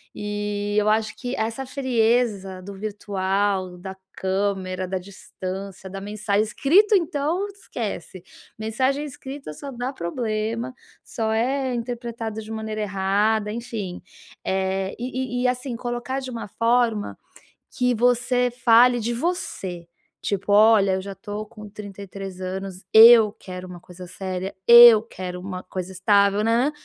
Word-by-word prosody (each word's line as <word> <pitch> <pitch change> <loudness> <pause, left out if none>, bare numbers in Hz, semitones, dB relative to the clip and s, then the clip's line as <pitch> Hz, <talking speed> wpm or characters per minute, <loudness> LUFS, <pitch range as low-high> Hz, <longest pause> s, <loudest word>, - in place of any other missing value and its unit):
e 205 0 -3
eu 210 0 +3
acho 220 0 +1
que 250 0 -4
essa 225 +4 -2
frieza 230 -7 0
do 200 +2 -9
virtual, 195 -2 -2
da 190 +2 -8 0.2
câmera, 190 -1 -2
da 190 +1 -2
distância, 190 0 -8
da 195 +1 -6
mensagem 205 +1 0
escrito 355 - +3
então, 340 +2 0
esquece. 225 - -6 0.4
Mensagem 260 +6 0
escrita 275 - -8
só 280 - -8
dá 245 +1 -4
problema, 220 +5 -3 0.3
só 220 -1 -3
é 260 +3 0
interpretado 235 -2 -4
de 215 - -10
maneira 220 -1 -4
errada, 205 +2 +1
enfim, 220 -5 -5 0.4
eh, 190 0 -1
e 255 0 -3
e - - -1
e - - +4
assim 250 0 -2
colocar 240 +2 -3
de 260 -1 -6
uma 230 -3 -6
forma 230 -1 +1 0.6
que 250 -2 +2
você 245 +1 +2
fale 240 +1 +6
de 235 +2 -2
você. 195 - -3 0.3
Tipo: 200 0 -2
"Olha, 210 -2 +6
eu 190 - -1
já 195 +1 -7
tô 210 +1 -6
com 210 0 -12
33 195 -2 -8
anos. 190 0 -5
Eu 225 -1 +9
quero 185 0 -8
uma 180 -1 -9
coisa 180 +1 -12
séria. 185 +1 -5
Eu 235 -2 +10
quero 180 -5 -7
uma 185 0 -6
coisa 185 0 -6
estável, 200 +2 +3
nãnãnã". 235 +6 +2
215 Hz, 140 wpm, -23 LUFS, 195-240 Hz, 0.6 s, Eu